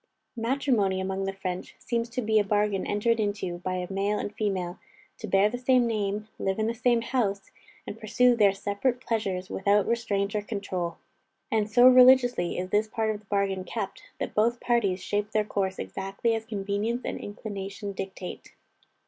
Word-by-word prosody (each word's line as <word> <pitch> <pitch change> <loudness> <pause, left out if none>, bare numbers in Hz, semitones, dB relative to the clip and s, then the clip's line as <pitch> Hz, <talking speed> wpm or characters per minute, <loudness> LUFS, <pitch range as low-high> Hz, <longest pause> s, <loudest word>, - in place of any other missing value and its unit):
Matrimony 230 -5 +1
among 190 +1 -2
the 195 - -1
French, 185 -2 -5
seems 235 -1 -2
to 250 +1 -3
be 215 0 +3
a - - +3
bargain 205 -1 0
entered 225 +3 +1
into 205 -4 -2
by 185 +1 -3
a 180 +1 -4
male 200 +2 0
and 205 - -4
female, 190 -5 -2 0.4
to 220 - -5
bear 195 +1 +4
the 245 +3 -4
same 250 -1 +4
name, 210 -2 -1
live 190 0 -1
in 220 - 0
the 230 - 0
same 235 0 +2
house, 205 -6 -1 0.3
and 225 - -7
pursue 245 +3 +3
their 205 -4 +5
separate 205 +6 -1
pleasures 200 -7 -2
without 200 +1 +2
restraint 205 -4 0
or 210 - 0
control. 190 -5 -4 0.5
And, 215 -1 +1
so 245 +3 +7
religiously 250 -7 +6
is 185 +1 -3
this 210 +1 +2
part 220 0 -1
of 210 - -4
the 210 - -25
bargain 195 -2 0
kept, 200 0 -5 0.2
that - - -3
both 235 +3 +2
parties 205 -6 +1
shape 205 +1 -2
their 215 -1 +2
course 190 -2 -1
exactly 195 +4 -2
as 225 0 -3
convenience 210 +3 -2
and - - -3
inclination 200 -1 -6
dictate. 190 -1 -7
205 Hz, 180 wpm, -27 LUFS, 195-230 Hz, 0.5 s, so